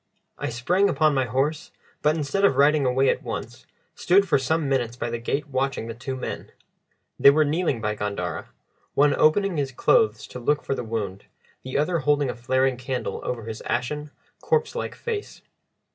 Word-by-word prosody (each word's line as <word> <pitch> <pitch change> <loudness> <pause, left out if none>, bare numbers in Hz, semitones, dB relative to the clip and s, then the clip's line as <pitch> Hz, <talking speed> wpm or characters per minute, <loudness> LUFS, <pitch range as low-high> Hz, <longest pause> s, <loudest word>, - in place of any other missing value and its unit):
I - - -2
sprang 175 +12 +2
upon 155 +2 +3
my 130 -2 +1
horse, 140 +7 -1 0.3
but, 150 +2 +2
instead 155 +6 -1
of 200 - +5
riding 145 0 +4
away 130 +2 +2
at - - 0
once, - - -6 0.3
stood 195 +2 +3
for 165 - +3
some 155 +3 0
minutes 120 -4 0
by 120 -1 -4
the 120 - -3
gate 145 +5 -2
watching 135 -3 -1
the 115 - -5
two 130 +3 -5
men. 130 - -6 0.7
They - - +9
were 155 +2 +4
kneeling 150 -5 0
by 105 -1 0
Gandara, 90 -5 -4 0.5
one 145 0 +4
opening 180 +4 +3
his 140 -2 -1
clothes 110 -3 +2
to 125 - -7
look 145 +4 0
for - - -1
the 130 - -3
wound, 105 -4 -4 0.4
the 130 +1 -3
other 165 +4 +1
holding 145 -2 +1
a - - -9
flaring 130 +1 +1
candle 125 0 -4
over 120 -2 -3
his 110 0 -6
ashen, 150 +4 -2 0.3
corpse 465 -1 +1
like - - -4
face. 440 -3 -5
135 Hz, 185 wpm, -24 LUFS, 120-155 Hz, 0.7 s, They